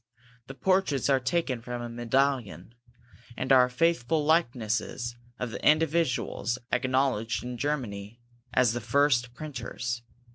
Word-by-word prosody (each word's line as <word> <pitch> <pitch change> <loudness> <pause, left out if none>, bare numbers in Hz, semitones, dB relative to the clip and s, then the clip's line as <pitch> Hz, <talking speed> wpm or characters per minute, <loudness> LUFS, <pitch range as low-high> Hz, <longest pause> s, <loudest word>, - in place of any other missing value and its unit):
The 135 - -8
portraits 185 -7 +1
are 135 - +4
taken 130 -1 -1
from 120 +1 -5
a - - -4
medallion, 120 - -1 0.6
and 130 - -2
are 125 -1 +6
faithful 155 +1 +1
likenesses 120 -5 0 0.2
of 125 -2 -4
the - - -7
individuals 155 -6 +2
acknowledged 125 -4 +1
in 125 0 -5
Germany 115 -6 -3 0.3
as 125 -2 +3
the 120 - -3
first 125 -2 +2
printers. 120 -4 -5
125 Hz, 120 wpm, -28 LUFS, 120-140 Hz, 0.6 s, are